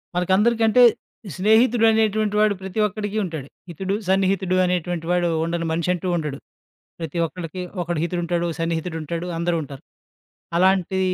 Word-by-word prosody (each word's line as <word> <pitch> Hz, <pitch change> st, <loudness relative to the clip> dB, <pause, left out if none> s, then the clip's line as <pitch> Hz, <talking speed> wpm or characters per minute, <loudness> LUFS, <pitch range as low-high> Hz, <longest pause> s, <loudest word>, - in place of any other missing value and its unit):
మనకి 180 Hz, +1 st, 0 dB
అందరికంటే, 230 Hz, +2 st, +3 dB, 0.5 s
స్నేహితుడు 220 Hz, +4 st, +4 dB
అనేటువంటి 215 Hz, -1 st, +1 dB
వాడు 215 Hz, -1 st, +4 dB
ప్రతి 190 Hz, +2 st, -5 dB
ఒక్కడికి 210 Hz, 0 st, -4 dB
ఉంటాడు. 160 Hz, -6 st, -5 dB, 0.2 s
హితుడు, 190 Hz, +4 st, -3 dB
సన్నిహితుడు 190 Hz, -1 st, +1 dB
అనేటువంటి 175 Hz, -2 st, -2 dB
వాడు 175 Hz, -1 st, +2 dB, 0.2 s
ఉండని 170 Hz, 0 st, -2 dB
మనిషంటూ 170 Hz, +2 st, -1 dB
ఉండడు, 150 Hz, -4 st, -3 dB, 0.6 s
ప్రతి 165 Hz, +1 st, -5 dB
ఒక్కళ్ళకి 175 Hz, +1 st, -6 dB, 0.2 s
ఒకడు 170 Hz, -2 st, -2 dB
హితుడు 175 Hz, +1 st, -2 dB
ఉంటాడు, 170 Hz, 0 st, -1 dB
ఓ -, -, -5 dB
సన్నిహితుడు 165 Hz, 0 st, -2 dB
ఉంటాడు 170 Hz, +3 st, -4 dB
అందరూ 170 Hz, +1 st, 0 dB
ఉంటారు. 140 Hz, -2 st, -10 dB, 0.8 s
అలాంటి 190 Hz, 0 st, +2 dB
180 Hz, 140 wpm, -22 LUFS, 170-200 Hz, 0.8 s, స్నేహితుడు